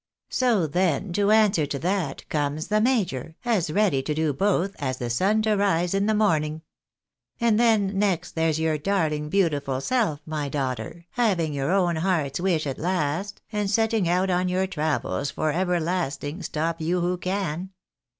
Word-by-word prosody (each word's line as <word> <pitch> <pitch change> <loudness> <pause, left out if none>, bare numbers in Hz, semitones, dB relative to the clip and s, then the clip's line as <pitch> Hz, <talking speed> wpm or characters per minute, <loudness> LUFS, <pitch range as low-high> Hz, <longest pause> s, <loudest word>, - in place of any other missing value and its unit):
So 235 -9 +2
then, 175 +3 0
to 205 +2 +2
answer 210 -8 +4
to 140 - -3
that, 175 -3 -2
comes 150 +1 -2
the 215 0 +2
major, 185 - 0
as 205 -9 +1
ready 185 -6 +2
to 150 +3 -3
do 155 -1 +1
both 195 +4 0
as 130 -2 -2
the 120 -2 -3
sun 205 - +2
to 215 0 +2
rise 185 -3 +1
in 195 +1 +1
the 220 - +2
morning. 160 -7 +1 0.8
And 230 -2 +3
then 205 -5 +3
next, 180 -4 0
there's 160 -1 +1
your 160 -1 0
darling 155 -4 0
beautiful 145 -8 +1
self, 205 - 0
my 150 -2 -3
daughter, 135 +3 -4
having 185 -10 +1
your 140 0 -1
own 180 -4 +2
heart's 160 -5 0
wish 175 -4 +1
at 135 -2 -4
last, 180 +3 -2
and 210 -2 -1
setting 220 -3 +1
out 185 +2 +2
on 180 0 +1
your 185 +1 +1
travels 150 - -1
for 155 +2 -1
everlasting, 175 -2 -1
stop 165 +2 -2
you 175 +3 0
who 175 +1 -1
can. 185 -2 -2
175 Hz, 170 wpm, -25 LUFS, 150-200 Hz, 0.8 s, answer